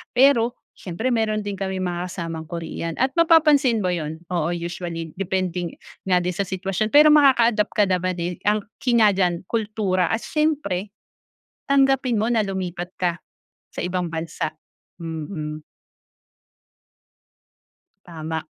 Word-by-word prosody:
Pero 245 Hz, -2 st, +4 dB, 0.2 s
siyempre 190 Hz, +7 st, -4 dB
meron 220 Hz, -3 st, +1 dB
din 205 Hz, -1 st, -4 dB
kaming 190 Hz, -1 st, -3 dB
mga 175 Hz, +1 st, -4 dB
kasamang 165 Hz, -3 st, -5 dB
Korean 165 Hz, -1 st, -4 dB
at 265 Hz, +4 st, +1 dB
mapapansin 305 Hz, -8 st, +5 dB
mo 190 Hz, -, -1 dB
yun. 160 Hz, -3 st, -3 dB
Oo, 170 Hz, -2 st, -1 dB
usually, 170 Hz, -1 st, -5 dB
depending 180 Hz, -2 st, -2 dB, 0.3 s
nga 185 Hz, -2 st, +3 dB
din 180 Hz, 0 st, -2 dB
sa 200 Hz, -, 0 dB
sitwasyon. 195 Hz, +3 st, -2 dB
Pero 300 Hz, +1 st, +8 dB
makaka-adapt 240 Hz, -8 st, +5 dB
ka 210 Hz, -, +3 dB
naman 185 Hz, 0 st, 0 dB
din, 175 Hz, +1 st, -2 dB
eh, -, -, -29 dB
ang 210 Hz, +1 st, +2 dB, 0.2 s
key 240 Hz, -2 st, +3 dB
nga 210 Hz, -3 st, +5 dB
diyan 180 Hz, -1 st, 0 dB
kultura 210 Hz, -5 st, 0 dB
at 225 Hz, -, +1 dB
siyempre, 235 Hz, -, -1 dB, 0.8 s
tanggapin 270 Hz, -3 st, +3 dB
mo 215 Hz, -, +1 dB
na 225 Hz, -, +3 dB
lumipat 185 Hz, -3 st, -4 dB
ka 180 Hz, -1 st, +1 dB, 0.6 s
sa -, -, -4 dB
ibang 180 Hz, 0 st, -1 dB
bansa. 160 Hz, -1 st, -3 dB, 0.5 s
Mm. 155 Hz, -2 st, -5 dB, 2.4 s
Tama. 160 Hz, -2 st, -5 dB
190 Hz, 135 wpm, -23 LUFS, 175-225 Hz, 2.4 s, Pero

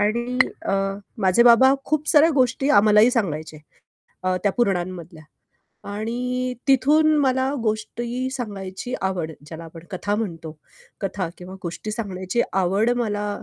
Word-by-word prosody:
आणि 235 Hz, +4 st, 0 dB, 0.2 s
अ, -, -, -2 dB, 0.5 s
माझे 190 Hz, +2 st, +4 dB
बाबा 245 Hz, +3 st, +7 dB
खूप 305 Hz, 0 st, -1 dB
साऱ्या 310 Hz, +2 st, +6 dB
गोष्टी 265 Hz, +1 st, +1 dB
आम्हालाही 210 Hz, +2 st, +6 dB
सांगायचे 160 Hz, -, -2 dB, 0.7 s
अ, 185 Hz, 0 st, 0 dB
त्या 200 Hz, -, +2 dB
पुराणांमधल्या. 180 Hz, -6 st, -2 dB, 0.7 s
आणि 250 Hz, +4 st, -3 dB
तिथून 300 Hz, +4 st, +4 dB
मला 265 Hz, -1 st, +1 dB
गोष्टी 235 Hz, +3 st, -2 dB
सांगायची 210 Hz, -2 st, -5 dB
आवड, 185 Hz, -4 st, -2 dB, 0.2 s
ज्याला 160 Hz, +2 st, -9 dB
आपण 165 Hz, 0 st, -12 dB
कथा 205 Hz, +2 st, -2 dB
म्हणतो, 165 Hz, -7 st, -5 dB, 0.4 s
कथा 190 Hz, -3 st, -3 dB
किंवा 180 Hz, +1 st, -9 dB
गोष्टी 175 Hz, +5 st, -5 dB
सांगण्याची 195 Hz, -1 st, -2 dB
आवड 195 Hz, +4 st, +2 dB
मला 210 Hz, -3 st, -2 dB
210 Hz, 125 wpm, -22 LUFS, 185-250 Hz, 0.7 s, बाबा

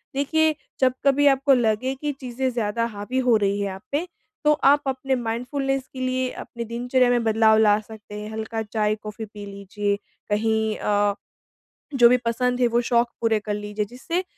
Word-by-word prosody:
देखिए 315 Hz, +3 st, +2 dB, 0.2 s
जब 260 Hz, -1 st, +3 dB
कभी 285 Hz, +1 st, +4 dB
आपको 275 Hz, 0 st, +4 dB
लगे 240 Hz, +1 st, +1 dB
कि 295 Hz, -1 st, -1 dB
चीजें 255 Hz, 0 st, -2 dB
ज़्यादा 230 Hz, -1 st, -1 dB
हावी 205 Hz, +5 st, -4 dB
हो 240 Hz, -, +6 dB
रही 200 Hz, +1 st, +1 dB
हैं 200 Hz, -1 st, -2 dB
आप 190 Hz, 0 st, -9 dB
पे, 305 Hz, +6 st, -1 dB, 0.4 s
तो 300 Hz, 0 st, +5 dB
आप 285 Hz, +1 st, +6 dB
अपने 265 Hz, 0 st, -1 dB
माइंडफुलनेस 260 Hz, +3 st, -2 dB
के 260 Hz, -, -8 dB
लिए 255 Hz, 0 st, -1 dB
अपनी 235 Hz, -1 st, -7 dB
दिनचर्या 245 Hz, +2 st, +1 dB
में 240 Hz, -1 st, +2 dB
बदलाव 220 Hz, 0 st, +4 dB
ला 210 Hz, -1 st, +4 dB
सकते 215 Hz, -1 st, -12 dB
हैं, 210 Hz, 0 st, -7 dB
हल्का 220 Hz, +1 st, -4 dB
चाय-कॉफी 215 Hz, 0 st, -2 dB
पी 210 Hz, -1 st, -10 dB
लीजिए, 200 Hz, +1 st, -3 dB, 0.3 s
कहीं 220 Hz, +1 st, +1 dB
अ, 205 Hz, 0 st, +1 dB, 0.8 s
जो 240 Hz, -2 st, +7 dB
भी 250 Hz, -, +5 dB
पसंद 250 Hz, +2 st, 0 dB
है 245 Hz, -, +5 dB
वो 235 Hz, +1 st, +1 dB
शौक 235 Hz, 0 st, +3 dB
पूरे 225 Hz, -2 st, +2 dB
कर 210 Hz, 0 st, -4 dB
लीजिए 210 Hz, 0 st, -3 dB
जिससे 255 Hz, -, -3 dB
235 Hz, 180 wpm, -23 LUFS, 210-260 Hz, 0.8 s, जो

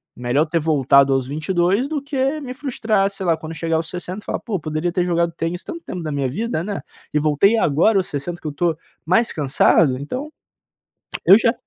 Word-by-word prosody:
Melhor 125 Hz, +5 st, +1 dB
ter 165 Hz, +1 st, 0 dB
voltado 140 Hz, -3 st, +4 dB
aos 135 Hz, -1 st, +1 dB
22 175 Hz, -, 0 dB
do 300 Hz, -1 st, -3 dB
que 280 Hz, +1 st, -1 dB
me 255 Hz, -3 st, -6 dB
frustrar, 225 Hz, -7 st, 0 dB
sei 195 Hz, -1 st, -6 dB
lá, 165 Hz, -2 st, +2 dB
quando 160 Hz, 0 st, -7 dB
chegar 165 Hz, 0 st, 0 dB
aos 160 Hz, 0 st, -3 dB
60" 180 Hz, +2 st, -5 dB
e -, -, -23 dB
falar: -, -, -2 dB
"Pô, 210 Hz, -6 st, -3 dB
poderia 155 Hz, +2 st, -2 dB
ter 180 Hz, +1 st, 0 dB
jogado 170 Hz, -1 st, +1 dB
tênis 170 Hz, +2 st, -3 dB
tanto 335 Hz, -, -7 dB
tempo 180 Hz, -, -5 dB
na 155 Hz, -2 st, -4 dB
minha 140 Hz, -2 st, -1 dB
vida, 215 Hz, -, -2 dB
né? 205 Hz, -1 st, -4 dB, 0.3 s
E 150 Hz, -, +3 dB
voltei 155 Hz, +9 st, +3 dB
agora 175 Hz, +4 st, +3 dB
aos 185 Hz, -, +1 dB
60 170 Hz, +5 st, -5 dB
que -, -, -6 dB
eu -, -, -2 dB
estou 165 Hz, +3 st, 0 dB, 0.3 s
mais 220 Hz, +8 st, +2 dB
cansado." 140 Hz, -1 st, +3 dB
Então, 255 Hz, -, -5 dB, 1.0 s
eu 195 Hz, -, +9 dB
já 230 Hz, 0 st, +3 dB
170 Hz, 210 wpm, -21 LUFS, 150-210 Hz, 1.0 s, eu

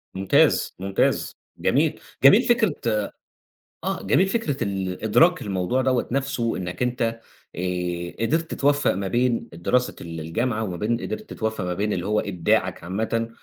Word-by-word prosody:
ممتاز، 95 Hz, 0 st, +3 dB
ممتاز، 95 Hz, +1 st, 0 dB, 0.2 s
جميل، -, -, +1 dB, 0.2 s
جميل 140 Hz, -, +8 dB
فكرة 230 Hz, -, +2 dB, 1.1 s
آآ -, -, -2 dB
جميل 165 Hz, -, +3 dB
فكرة 195 Hz, -, -1 dB
ال 95 Hz, -2 st, -3 dB
إدراك 170 Hz, +11 st, +4 dB
الموضوع 100 Hz, +6 st, 0 dB
دوّة 130 Hz, -2 st, +1 dB
نفسْه 130 Hz, -3 st, -1 dB
إنَّك 90 Hz, +4 st, -4 dB
أنت 115 Hz, -2 st, -1 dB, 0.4 s
آآ، 90 Hz, -1 st, -2 dB
قدرت 160 Hz, +6 st, -1 dB
توفّق 145 Hz, +1 st, +2 dB
ما 95 Hz, 0 st, -3 dB
بين 120 Hz, +3 st, +1 dB
الدراسة 120 Hz, +9 st, 0 dB
ال 80 Hz, -1 st, -6 dB
الجامعة 110 Hz, +8 st, -1 dB
وما 90 Hz, -4 st, -4 dB
بين 115 Hz, +6 st, -1 dB
قدرت 215 Hz, +1 st, -6 dB
توفّق 110 Hz, -4 st, -2 dB
ما 90 Hz, 0 st, -2 dB
بين 105 Hz, +3 st, -1 dB
اللي 90 Hz, -1 st, -2 dB
هو 105 Hz, +1 st, +2 dB
إبداعَك 90 Hz, -3 st, 0 dB
عامةً 110 Hz, +5 st, -1 dB
110 Hz, 145 wpm, -24 LUFS, 95-130 Hz, 1.1 s, جميل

